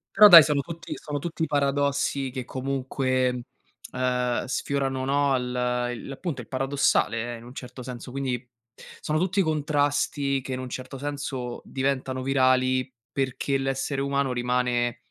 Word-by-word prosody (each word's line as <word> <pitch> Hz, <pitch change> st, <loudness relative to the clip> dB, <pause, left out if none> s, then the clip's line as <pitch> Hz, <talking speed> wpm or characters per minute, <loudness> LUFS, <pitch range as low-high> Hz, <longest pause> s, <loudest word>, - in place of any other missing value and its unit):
Però, 210 Hz, +1 st, +10 dB
dai, 170 Hz, -6 st, +12 dB
sono 145 Hz, -1 st, +1 dB
tutti 165 Hz, +3 st, -6 dB
sono 145 Hz, -1 st, -4 dB
tutti 165 Hz, +2 st, -3 dB
i -, -, +3 dB
paradossi 140 Hz, -1 st, 0 dB
che 130 Hz, -1 st, -4 dB
comunque, 130 Hz, -1 st, -1 dB, 0.5 s
uhm, 125 Hz, -1 st, 0 dB
sfiorano, 135 Hz, 0 st, -1 dB
no, 140 Hz, -1 st, +2 dB
l' 125 Hz, 0 st, -1 dB
i 115 Hz, -, -8 dB
l'appunto, 135 Hz, 0 st, -5 dB
il 115 Hz, -, -14 dB
paradossale 130 Hz, -3 st, +1 dB
in 115 Hz, -, -13 dB
un 125 Hz, -, -11 dB
certo 125 Hz, -1 st, -9 dB
senso, 125 Hz, 0 st, -7 dB
quindi 130 Hz, -2 st, -3 dB, 0.5 s
sono 155 Hz, +1 st, -1 dB
tutti 185 Hz, +3 st, +1 dB
contrasti 145 Hz, -3 st, 0 dB
che, 130 Hz, -, -7 dB
in 130 Hz, -, -2 dB
un 130 Hz, -, -5 dB
certo 130 Hz, +2 st, -6 dB
senso, 135 Hz, -3 st, -4 dB
diventano 130 Hz, -1 st, -2 dB
virali 130 Hz, -1 st, +2 dB, 0.2 s
perché 135 Hz, +1 st, -1 dB
l'essere 135 Hz, +1 st, -2 dB
umano 140 Hz, -1 st, 0 dB
rimane 120 Hz, -1 st, 0 dB
135 Hz, 145 wpm, -26 LUFS, 125-140 Hz, 0.5 s, dai